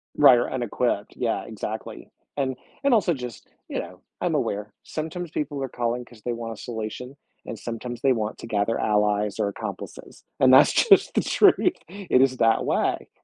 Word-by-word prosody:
Right, 130 Hz, -4 st, +7 dB
or, 120 Hz, -, 0 dB
unequipped, 120 Hz, -4 st, -2 dB
yeah, -, -, -1 dB
exactly. -, -, -6 dB, 0.3 s
And 130 Hz, -2 st, -1 dB, 0.3 s
and 275 Hz, -3 st, +4 dB
also 195 Hz, -6 st, +3 dB
just, 125 Hz, -5 st, -8 dB, 0.2 s
you -, -, -3 dB
know, -, -, -8 dB, 0.2 s
I'm -, -, 0 dB
aware, 105 Hz, +2 st, -2 dB
sometimes 160 Hz, +2 st, -5 dB
people 145 Hz, -1 st, -3 dB
are 135 Hz, -, -3 dB
calling 120 Hz, +1 st, -2 dB
'cause 120 Hz, -3 st, -17 dB
they 120 Hz, -, -2 dB
want 115 Hz, -1 st, -5 dB
a -, -, -12 dB
solution 120 Hz, +3 st, -6 dB, 0.3 s
and 115 Hz, -, -6 dB
sometimes 120 Hz, +1 st, -6 dB
they 135 Hz, -1 st, +4 dB
want 110 Hz, -2 st, -3 dB
to -, -, -9 dB
gather 110 Hz, 0 st, 0 dB
allies 105 Hz, -1 st, +1 dB
or 100 Hz, -, +1 dB
accomplices, 100 Hz, -, -8 dB, 0.2 s
and 130 Hz, 0 st, +6 dB
that's -, -, +8 dB
just 405 Hz, -4 st, +4 dB
the -, -, +3 dB
truth, 365 Hz, -3 st, +4 dB, 0.2 s
it 185 Hz, -8 st, +1 dB
is 130 Hz, -1 st, +3 dB
that 115 Hz, -1 st, +3 dB
way. -, -, 0 dB
125 Hz, 180 wpm, -25 LUFS, 110-140 Hz, 0.3 s, that's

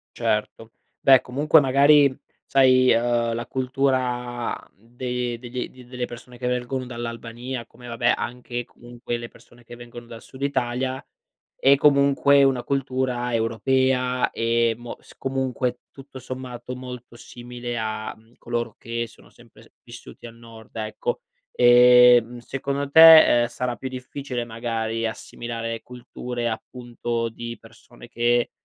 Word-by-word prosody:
Certo, 115 Hz, 0 st, -2 dB, 0.3 s
beh, 135 Hz, -2 st, +6 dB
comunque, 145 Hz, +5 st, +3 dB
magari, 140 Hz, 0 st, +4 dB, 0.3 s
sai, 130 Hz, -1 st, +4 dB
ehm, 120 Hz, 0 st, +1 dB
la 120 Hz, 0 st, -5 dB
cultura 125 Hz, -2 st, -1 dB, 0.2 s
de 120 Hz, +2 st, -5 dB
degli 125 Hz, +1 st, -7 dB
delle 125 Hz, 0 st, -5 dB
persone 120 Hz, +1 st, -12 dB
che 125 Hz, -, -6 dB
vengono 125 Hz, +1 st, -2 dB
dall'Albania 120 Hz, +1 st, -6 dB
come, 125 Hz, 0 st, -15 dB
vabbè, 120 Hz, +1 st, +1 dB
anche 120 Hz, 0 st, -5 dB
comunque 120 Hz, 0 st, -7 dB
le 120 Hz, -, -7 dB
persone 120 Hz, 0 st, -20 dB
che 120 Hz, -, -12 dB
vengono 120 Hz, 0 st, -11 dB
dal 115 Hz, -1 st, -11 dB
Sud 135 Hz, +1 st, -11 dB
Italia, 130 Hz, -1 st, -2 dB, 0.6 s
è 135 Hz, +1 st, +6 dB
comunque 140 Hz, 0 st, +4 dB
una 130 Hz, -2 st, +2 dB
cultura 130 Hz, -3 st, -2 dB
europea 125 Hz, +3 st, +1 dB
e 115 Hz, 0 st, +1 dB
mo 120 Hz, 0 st, -9 dB
s -, -, -18 dB
comunque, 130 Hz, -2 st, -2 dB
tutto 135 Hz, -1 st, -12 dB
sommato, 125 Hz, -1 st, -7 dB
molto 125 Hz, -2 st, -10 dB
simile 120 Hz, 0 st, -8 dB
a, 110 Hz, 0 st, -4 dB
mhmm, 110 Hz, +2 st, -24 dB
coloro 120 Hz, -1 st, -4 dB
che 115 Hz, 0 st, -4 dB
sono -, -, -20 dB
sempre -, -, -20 dB
vissuti -, -, -12 dB
al 115 Hz, -, -13 dB
Nord 115 Hz, -1 st, -15 dB
ecco. 115 Hz, -, -4 dB, 0.3 s
Ehm, 125 Hz, -1 st, +6 dB
secondo 140 Hz, +3 st, -4 dB
te, 160 Hz, -6 st, +9 dB
ehm, 120 Hz, -, +1 dB
sarà 125 Hz, 0 st, -4 dB
più 130 Hz, -, -6 dB
difficile 130 Hz, -1 st, -5 dB
magari 115 Hz, -1 st, -3 dB
assimilare 115 Hz, 0 st, -6 dB
culture, 125 Hz, -1 st, -6 dB
appunto 120 Hz, 0 st, -4 dB
,di 115 Hz, +1 st, -8 dB
persone -, -, -16 dB
che, 120 Hz, 0 st, +1 dB
120 Hz, 130 wpm, -23 LUFS, 120-130 Hz, 0.6 s, te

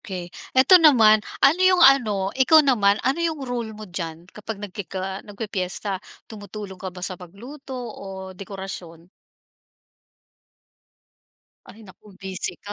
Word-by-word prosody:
okey. 180 Hz, -3 st, -7 dB, 0.2 s
Ito 345 Hz, +8 st, +7 dB
naman, 225 Hz, -9 st, +6 dB, 0.2 s
ano 325 Hz, +7 st, +4 dB
yung 370 Hz, -2 st, +5 dB
ano, 215 Hz, -8 st, +4 dB
ikaw 295 Hz, +4 st, +5 dB
naman, 205 Hz, -7 st, +3 dB
ano 265 Hz, +5 st, +1 dB
yung 320 Hz, -4 st, -2 dB
role 240 Hz, -3 st, -4 dB
mo 215 Hz, -, -9 dB
diyan, 170 Hz, -3 st, -6 dB
kapag 215 Hz, +1 st, -7 dB
nagkiki 200 Hz, -1 st, -7 dB
ah, 190 Hz, +1 st, -4 dB
nagpipiyesta, 200 Hz, -2 st, -4 dB, 0.2 s
tumutulong 205 Hz, -3 st, -9 dB
ka 190 Hz, -, -5 dB
ba 180 Hz, 0 st, -11 dB
sa 185 Hz, -2 st, -4 dB
pagluto 255 Hz, -, -10 dB
o 195 Hz, -5 st, -8 dB
dekorasyon? 185 Hz, -3 st, -9 dB, 2.6 s
Ay, 220 Hz, -, -14 dB
naku 190 Hz, +3 st, -18 dB
busy 190 Hz, -2 st, -3 dB
ka 205 Hz, -, -6 dB
205 Hz, 130 wpm, -23 LUFS, 190-255 Hz, 2.6 s, Ito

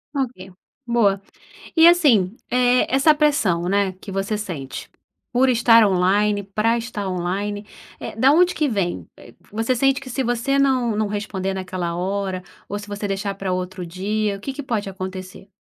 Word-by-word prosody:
Ok, 230 Hz, -9 st, -3 dB, 0.4 s
boa. 205 Hz, -5 st, +2 dB, 0.6 s
E 325 Hz, +1 st, +8 dB
assim, 250 Hz, -, +5 dB, 0.2 s
eh, 250 Hz, 0 st, +3 dB
essa 295 Hz, +3 st, +5 dB
pressão, 215 Hz, -, +1 dB
né, 200 Hz, -1 st, +1 dB
que 190 Hz, +2 st, -11 dB
você 195 Hz, +2 st, -2 dB
sente, 165 Hz, -10 st, -6 dB, 0.4 s
por 260 Hz, +1 st, +3 dB
estar 230 Hz, -2 st, +6 dB
online, 200 Hz, +2 st, +2 dB
pra 215 Hz, +4 st, 0 dB
estar 215 Hz, -4 st, -4 dB
online, 200 Hz, +4 st, -3 dB, 0.3 s
eh, -, -, -7 dB
da 260 Hz, +5 st, +5 dB
onde 360 Hz, +3 st, +4 dB
que 305 Hz, -, +1 dB
vem? 175 Hz, -, -2 dB
Eh, -, -, -14 dB
p -, -, -31 dB, 0.2 s
você 225 Hz, +4 st, 0 dB
sente 270 Hz, +2 st, +2 dB
que 270 Hz, -, -10 dB
se 265 Hz, +2 st, -2 dB
você 245 Hz, +3 st, 0 dB
não 255 Hz, -5 st, +2 dB
não 215 Hz, -1 st, 0 dB
responder 200 Hz, -2 st, -3 dB
naquela 185 Hz, -2 st, -4 dB
hora, 190 Hz, 0 st, -2 dB, 0.3 s
ou 205 Hz, -, -3 dB
se 205 Hz, 0 st, -10 dB
você 205 Hz, 0 st, -4 dB
deixar 195 Hz, 0 st, -2 dB
para 195 Hz, -1 st, -3 dB
outro 185 Hz, 0 st, -4 dB
dia, 200 Hz, +4 st, -2 dB
o -, -, -13 dB
que 275 Hz, -, -5 dB
que 290 Hz, -, -5 dB
pode 220 Hz, -6 st, -2 dB
acontecer? 185 Hz, 0 st, -7 dB
205 Hz, 175 wpm, -21 LUFS, 190-245 Hz, 0.6 s, E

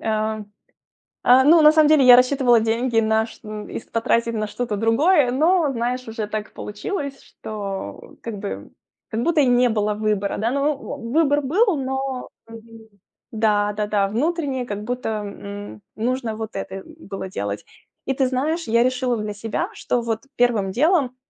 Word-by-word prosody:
э 215 Hz, 0 st, -1 dB, 0.8 s
э, 255 Hz, +2 st, +7 dB
ну, 320 Hz, +3 st, +6 dB
на 300 Hz, -, +8 dB
самом 310 Hz, -1 st, +5 dB
деле 305 Hz, -3 st, +5 dB
я 245 Hz, -, +10 dB
рассчитывала 250 Hz, -2 st, +4 dB
деньги 230 Hz, +1 st, +1 dB
на 220 Hz, 0 st, +2 dB
ш 225 Hz, -, -14 dB, 0.3 s
их -, -, -8 dB
потратить 230 Hz, 0 st, +1 dB
на 215 Hz, -1 st, -1 dB
что-то 230 Hz, 0 st, -3 dB
другое, 245 Hz, -, +3 dB
но, 315 Hz, +2 st, +2 dB
знаешь, 250 Hz, 0 st, -3 dB
уже 220 Hz, -1 st, -4 dB
так 215 Hz, 0 st, -5 dB
получилось, 275 Hz, -, -5 dB
что 200 Hz, -3 st, -7 dB
как 230 Hz, -2 st, -5 dB
бы 200 Hz, 0 st, -6 dB, 0.4 s
как 225 Hz, 0 st, -2 dB
будто 330 Hz, 0 st, +3 dB
и -, -, +4 dB
не 245 Hz, 0 st, +4 dB
было 210 Hz, -1 st, 0 dB
выбора, 210 Hz, -2 st, -1 dB
да. 225 Hz, +3 st, 0 dB
Ну, 280 Hz, +2 st, +1 dB
в 275 Hz, -, -12 dB
оу, 230 Hz, 0 st, -6 dB
выбор 295 Hz, -1 st, +3 dB
был, 365 Hz, -, +2 dB
но 265 Hz, -1 st, -3 dB, 0.2 s
мгм, 225 Hz, 0 st, -13 dB, 0.4 s
да-да-да. 210 Hz, -2 st, +1 dB
Внутреннее 275 Hz, -, -1 dB
как 205 Hz, -2 st, -5 dB
будто, 245 Hz, +1 st, -3 dB
м, 205 Hz, -, -6 dB
нужно 240 Hz, 0 st, -2 dB
вот 220 Hz, -1 st, -6 dB
это 195 Hz, 0 st, -5 dB
было 260 Hz, -13 st, -8 dB
делать. 100 Hz, -, -4 dB, 0.4 s
И 270 Hz, -, 0 dB
ты 265 Hz, 0 st, +1 dB
знаешь, 295 Hz, +6 st, -1 dB
я 235 Hz, +1 st, +3 dB
решила 255 Hz, -1 st, 0 dB
для 210 Hz, -1 st, -4 dB
себя, 225 Hz, -, -3 dB
что 245 Hz, -, -1 dB
вот 225 Hz, +1 st, -3 dB
первым 230 Hz, -6 st, +2 dB
делом, 280 Hz, -, +2 dB
235 Hz, 165 wpm, -22 LUFS, 215-270 Hz, 0.8 s, я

